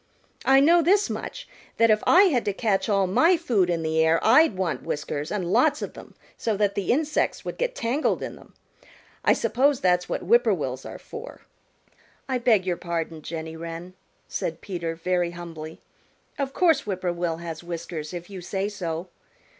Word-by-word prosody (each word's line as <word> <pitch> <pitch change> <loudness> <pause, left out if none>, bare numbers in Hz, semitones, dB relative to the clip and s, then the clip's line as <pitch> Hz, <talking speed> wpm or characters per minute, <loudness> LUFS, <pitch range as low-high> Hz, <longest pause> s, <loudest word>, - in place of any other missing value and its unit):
I 270 0 +6
know 335 +4 +6
this 395 +5 +3
much, - - -6 0.3
that 230 -1 +5
if 215 0 +3
I 365 +3 +7
had 285 - +2
to 205 - 0
catch 210 0 0
all 195 -2 +3
my 330 - +4
food 220 - +1
in 170 -2 0
the 160 0 +2
air 160 +1 +3
I'd 250 - +5
want 185 -4 -1
whiskers 150 0 -4
and 185 -3 -2
lots 290 +6 +3
of - - -5
them - - -13 0.2
so 220 -3 -1
that 205 -1 +1
the 200 -3 -1
insects 305 +3 0
would - - -6
get - - -1
tangled 250 +5 0
in - - -5
them. - - -18 0.7
I - - +5
suppose 270 +2 +2
that's 180 -1 +1
what - - -2
Whip 475 +1 +4
poor - - +3
will's - - -4
are - - -8
for." 460 +2 -10 0.9
"I 260 -2 0
beg 225 -6 +3
your 180 -2 -1
pardon, 165 -2 -4
Jenny 160 +1 -6
Wren," 165 +2 -7 0.3
said 160 - -3
Peter 170 -4 -4
very 175 +1 0
humbly. 160 -2 -8 0.6
"Of 275 -1 -1
course 325 -4 +2
Whip 190 -3 -3
poor 175 -2 0
will 170 -1 -2
has 165 -1 -7
whiskers 170 -2 -6
if 175 -1 -7
you 195 -3 -8
say 195 +3 -2
so. 175 -4 -4
190 Hz, 190 wpm, -25 LUFS, 170-255 Hz, 0.9 s, I